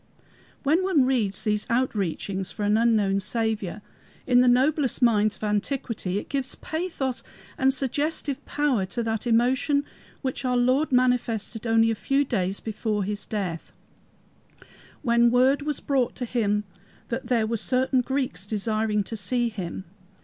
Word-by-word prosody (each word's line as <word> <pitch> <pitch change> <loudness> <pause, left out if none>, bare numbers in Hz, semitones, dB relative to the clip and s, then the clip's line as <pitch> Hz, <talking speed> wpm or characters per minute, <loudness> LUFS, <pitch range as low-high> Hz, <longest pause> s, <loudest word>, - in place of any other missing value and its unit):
When 310 +5 +3
one 365 -8 +3
reads 225 -7 0
these 210 -1 0
outreachings 200 -5 -1
for 210 - -5
an 205 +1 +3
unknown 215 -4 +3
Saviour 210 -1 -2 0.4
in 250 -1 +5
the 250 - +4
noblest 265 +2 +3
minds 215 -3 +3
of - - -13
antiquity, 210 -2 -2
it - - -4
gives 270 -2 -2
pathos 315 -6 -3 0.3
and 265 +1 +3
suggestive 280 +1 -2
power 290 -8 +1
to 235 +5 -3
that 225 +1 -2
emotion 260 +5 +2 0.4
which 260 0 -2
our 250 -1 +1
Lord 260 +5 +2
manifested 240 -3 +1
only 225 0 +4
a - - +1
few 275 +6 +1
days 195 -6 -1
before 215 -1 -2
his 205 +1 -4
death, 185 -6 -4 1.3
when 235 -2 +4
word 255 +4 +3
was 295 -1 -2
brought 265 -4 0
him 220 -4 0 0.5
that 240 +2 -3
there 235 -4 +2
were 230 +1 -1
certain 255 +3 +2
Greeks 250 -8 -2
desiring 215 0 0
to 225 - -6
see 235 +4 0
him. 190 -4 -6
235 Hz, 145 wpm, -25 LUFS, 210-260 Hz, 1.3 s, in